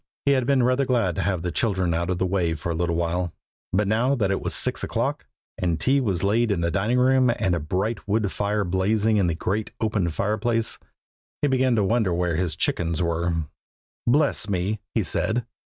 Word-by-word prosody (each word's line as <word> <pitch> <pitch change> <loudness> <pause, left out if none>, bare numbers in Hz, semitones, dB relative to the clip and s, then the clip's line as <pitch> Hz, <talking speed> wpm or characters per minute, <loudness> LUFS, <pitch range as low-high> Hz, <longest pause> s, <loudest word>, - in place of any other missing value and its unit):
He 140 - +4
had 130 -3 +2
been 135 -3 +3
rather 130 +2 +2
glad 120 -9 +1
to - - -2
have 95 -4 -1
the 90 - -2
children 95 -6 0
out 85 +1 -1
of 90 - 0
the 95 - 0
way 90 -3 0
for 80 +3 -4
a - - -1
little 85 +1 -1
while, 85 +1 -1 0.4
but 100 +2 +1
now 120 +6 +2
that 100 -6 0
it 95 - -1
was - - -2
six - - +1
o'clock, - - -2 0.3
and 85 -3 0
tea 135 +1 +3
was 100 -8 -1
laid 110 +4 +2
in 100 -5 0
the 85 0 0
dining 105 +7 +1
room, 130 0 +4
and 95 -5 +1
a 85 - 0
bright 95 +9 -2
wood 105 -1 +1
fire 105 0 -1
blazing 105 +4 +1
in 95 -3 +2
the 85 - 0
great 100 +6 -2
open 105 -5 0
fireplace, 110 +6 -1 0.6
he - - +4
began 130 -2 +2
to 105 - +2
wonder 110 -1 +1
where 85 -1 0
his 85 -2 -1
chickens 85 0 -1
were. 85 -1 0 0.6
"Bless 140 -4 +2
me!" 100 +3 -1 0.2
he - - +2
said. 115 +1 0
100 Hz, 210 wpm, -24 LUFS, 85-115 Hz, 0.6 s, He